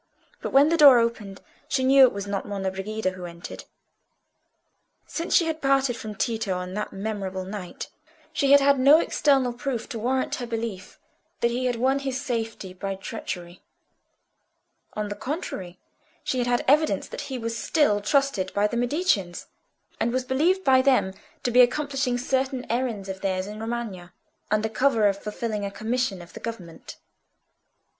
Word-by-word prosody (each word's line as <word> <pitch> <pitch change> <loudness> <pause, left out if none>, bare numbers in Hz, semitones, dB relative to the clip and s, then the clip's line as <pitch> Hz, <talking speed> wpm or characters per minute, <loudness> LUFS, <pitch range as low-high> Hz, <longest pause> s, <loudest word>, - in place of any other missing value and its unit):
But - - -3
when 280 +3 +6
the 335 - +2
door 285 -5 +9
opened 225 -5 -1 0.3
she 265 -1 0
knew 270 +1 +6
it 255 - +2
was 200 0 -5
not 200 -1 -3
Monna 195 -2 -2
Brigida 195 +1 -3
who 185 -1 -8
entered. 170 0 -9 1.4
Since 335 +1 -2
she 340 - +5
had 320 -1 -3
parted 270 -2 +2
from 215 -2 -7
Tito 220 -4 -1
on 180 0 -5
that 210 +1 -3
memorable 195 -2 -4
night, 190 -2 -7 0.5
she 280 -3 +1
had 285 0 +8
had 280 -1 +4
no 280 +4 +7
external 270 -6 +2
proof 245 -1 -4
to 235 -5 -5
warrant 260 +4 0
her 245 - -5
belief 225 -5 -5 0.4
that 235 - +2
he 250 +2 -2
had 245 - 0
won 260 +4 +1
his 265 -2 -3
safety 225 -8 -4
by 195 +1 -4
treachery; 180 -3 -7 1.3
on 210 -1 -3
the 205 - -4
contrary, 205 - -5 0.5
she 255 - -1
had 245 - 0
had 245 0 +1
evidence 300 +3 +3
that - - -6
he 265 - -3
was 230 -1 -3
still 215 -3 +2
trusted 275 -5 +1
by 205 +1 +3
the 235 +3 -1
Mediceans, 240 - 0 0.5
and 235 - +1
was 255 +1 0
believed 320 +9 +1
by 260 -3 +5
them 255 -8 +2 0.3
to 245 - 0
be 250 +2 +7
accomplishing 270 0 +1
certain 260 +1 -1
errands 235 -5 -2
of 190 0 -6
theirs 185 -1 -1
in 210 +1 -8
Romagna, 220 -6 -5 0.4
under 215 +1 +1
cover 225 0 +2
of 200 0 -1
fulfilling 210 0 -3
a 200 - -2
commission 220 -2 -2
of 170 - -16
the - - -8
government. 180 -8 -8
230 Hz, 170 wpm, -25 LUFS, 200-265 Hz, 1.4 s, door